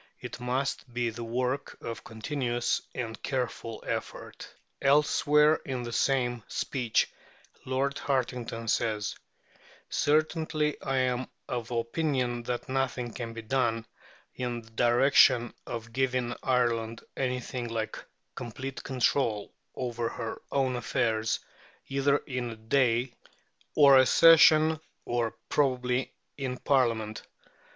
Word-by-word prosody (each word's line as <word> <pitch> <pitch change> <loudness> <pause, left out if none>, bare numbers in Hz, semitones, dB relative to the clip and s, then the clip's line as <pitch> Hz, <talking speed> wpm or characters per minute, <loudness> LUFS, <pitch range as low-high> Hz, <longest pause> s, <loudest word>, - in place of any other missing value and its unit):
It - - -7
must 125 +1 -2
be 120 -1 -1
the 120 +1 -7
work 125 +4 -2
of 115 -1 -6
continuous 120 +1 -1
and 115 -3 -4
careful 125 -4 -3
effort." - - -5 0.3
Elsewhere 150 +2 +4
in 130 -3 -3
the 120 - -5
same 120 -2 +1
speech 125 -5 0 0.6
Lord 135 +2 0
Hartington 125 -4 -2
says: 110 -2 0 0.8
"Certainly 155 0 +1
I 135 0 -1
am 130 -1 +1 0.2
of 120 -2 -3
opinion 120 0 -1
that 120 -1 -2
nothing 130 -3 -1
can 115 -1 -5
be 115 0 -7
done 115 -2 0 0.5
in 120 -2 -3
the 115 - -18
direction 120 +1 +4
of 115 -1 -6
giving 130 -2 0
Ireland 115 -3 0
anything 125 -1 -2
like 110 -1 -3 0.3
complete 130 +3 -6
control 125 -4 0 0.2
over 120 -2 -2
her 115 -3 -5
own 130 -2 +1
affairs 110 -1 0 0.5
either 140 +1 +2
in 125 -3 -3
a 115 - -6
day, 120 +2 +1 0.6
or 140 -3 +8
a 130 - +5
session, 160 -1 +7 0.3
or 120 -2 -1
probably 125 -2 +1 0.3
in 130 -2 -2
a - - -13
Parliament." 115 -6 +1
125 Hz, 115 wpm, -29 LUFS, 115-135 Hz, 0.8 s, or